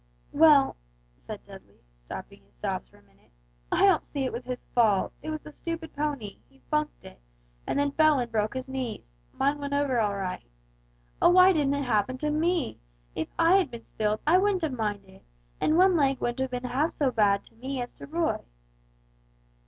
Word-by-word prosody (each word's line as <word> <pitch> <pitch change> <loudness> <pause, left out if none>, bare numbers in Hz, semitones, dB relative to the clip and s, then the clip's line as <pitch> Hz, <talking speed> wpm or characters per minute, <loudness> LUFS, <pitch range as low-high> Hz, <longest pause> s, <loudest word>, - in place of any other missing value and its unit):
"Well," 295 -3 +5 0.4
said - - -9
Dudley, - - -15
stopping - - -10
his 65 -2 -31
sobs - - -3
for - - -22
a - - -23
minute; - - -29 0.4
"I - - +4
don't 380 -5 +4
see 280 -2 -3
it 255 - -3
was 240 +1 -5
his 250 0 -5
fault; 215 -5 +3
it - - -6
was 310 -1 -4
the 300 - -12
stupid 330 0 -6
pony; 285 -8 -3
he 270 - -26
funked 300 0 -1
it, - - -13 0.5
and - - -1
then 285 0 +1
fell 310 0 +4
and 240 -2 -2
broke 215 +2 0
his 260 0 -4
knees; 255 - -5 0.2
mine 280 +2 0
went 285 0 -4
over 280 -4 +1
all 205 -2 +1
right. 185 - -5 0.7
Oh, - - +7
why 365 +1 +7
didn't 285 -4 +1
it 285 - -1
happen 235 +1 +1
to 300 +3 -1
me! 325 -2 0 0.3
If 160 - -3
I 335 +3 +5
had 385 - +1
been 235 -1 -9
spilled, 215 0 -2
I 340 +4 +5
wouldn't 390 -2 +1
have 315 - 0
minded, 205 -5 -4 0.4
and 310 - +2
one 370 0 +5
leg 275 -4 +2
wouldn't 240 +1 -2
have 265 0 0
been 250 0 -4
half 290 +6 +1
so 275 -4 +2
bad 205 -4 +2
to - - -22
me 260 +3 -5
as 245 0 -5
to - - -11
Roy!" 325 +2 0
270 Hz, 200 wpm, -27 LUFS, 225-310 Hz, 0.7 s, Oh